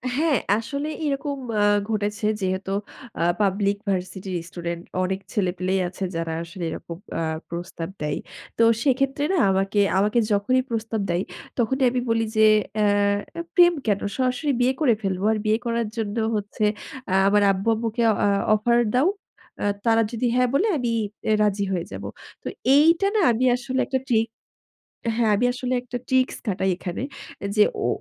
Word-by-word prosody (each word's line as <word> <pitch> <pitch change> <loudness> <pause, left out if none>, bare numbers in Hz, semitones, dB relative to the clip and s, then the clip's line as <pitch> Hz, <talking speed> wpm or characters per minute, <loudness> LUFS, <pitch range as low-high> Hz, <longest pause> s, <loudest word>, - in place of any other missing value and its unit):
হ্যাঁ, 305 -1 +2 0.2
আসলে 280 +6 -3 0.2
এরকম 285 0 -2 0.2
আ - - +4 0.3
ঘটেছে 210 0 -1 0.2
যেহেতু 190 +1 -2 0.5
আ - - 0 0.2
পাবলিক 200 +1 +1
ভার্সিটির 185 0 -3
স্টুডেন্ট, 170 -1 -5 0.2
অনেক 190 +1 -1
ছেলেপেলেই 185 -1 0
আছে 190 +2 -6
যারা 165 -1 -2
আসলে 170 +1 -8
এরকম 165 +1 -7 0.2
আ - - -1 0.3
প্রস্তাব 170 -1 -5
দেয়। 150 -1 -1 0.4
তো 230 - +4 0.2
সেক্ষেত্রে 275 +1 +1
না - - +2
আমাকে 195 +2 +1 0.2
আমাকে 210 +5 +3
যখনই 205 +6 +2
প্রস্তাব 225 -1 -2
দেয় 175 +2 +1 0.3
তখনই 265 +3 +1
আমি 250 - 0
বলি 225 0 +2
যে, 220 - +6 0.3
"অ্যা 210 - +3 0.7
প্রেম 350 -1 +7
কেন? 205 -2 +2 0.2
সরাসরি 255 +3 0
বিয়ে 255 +2 +3
করে 260 -6 +5
ফেলবো। 195 -1 -1
আর 220 - +1
বিয়ে 215 +1 +3
করার 235 -1 0
জন্য 215 0 -2 0.2
হচ্ছে 210 +1 -2 0.5
আ - - +1
আমার 205 +1 +4
আব্বু-আম্মুকে 225 +4 -1
আ - - +2
অ - - +4 0.3
অফার 235 +3 +2 0.2
দাও। 260 +6 +4 0.6
আ - - +1 0.2
তারা 225 0 +4
যদি 235 +1 -2
'হ্যাঁ' 250 0 +3
বলে 370 +11 +3
আমি 240 -3 -1 0.4
আ - - +4
রাজি 200 -1 +1
হয়ে 175 -2 -1
যাব।" - - -7 0.4
তো - - -6 0.3
এইটা 330 +6 +5
না 430 - +4
আমি 235 +3 +1
আসলে 260 +1 -3
একটা 265 -1 -1
ট্রিক 225 -1 +3 0.9
হ্যাঁ 225 -3 +2
আমি 245 - +2
আসলে 255 0 -2
একটা 250 0 -5
ট্রিকস 260 0 +2
খাটাই 190 -2 0
এখানে। 180 +5 -5 0.4
এ - - 0
যে 210 - +7 0.2
ও - - +2
220 Hz, 165 wpm, -24 LUFS, 190-250 Hz, 0.9 s, প্রেম